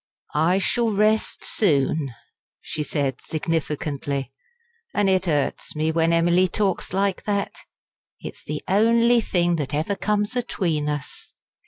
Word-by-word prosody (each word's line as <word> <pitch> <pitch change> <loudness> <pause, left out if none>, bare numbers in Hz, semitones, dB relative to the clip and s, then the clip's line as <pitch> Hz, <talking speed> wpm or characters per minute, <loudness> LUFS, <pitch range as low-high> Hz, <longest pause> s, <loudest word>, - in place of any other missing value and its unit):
"I 165 +5 +3
shall 230 +4 +1
rest 215 +1 +1
soon," 145 - +1 0.4
she 155 - -5
said 140 -3 -2
significantly. 145 -4 -2 0.6
"An' 205 - +3
it 190 -1 +2
hurts 145 -2 -1
me 155 +1 +1
when 165 0 +2
Emily 175 +2 +4
talks 195 +1 -1
like 195 0 0
that. 200 -1 -1 0.7
It's - - -9
the 150 0 -5
only 230 +4 +4
thing 175 -4 +1
that 145 -1 -3
ever 160 +7 -1
comes 210 +4 -1
atween 165 -11 -1
us. 145 -2 -6
175 Hz, 130 wpm, -23 LUFS, 150-200 Hz, 0.7 s, Emily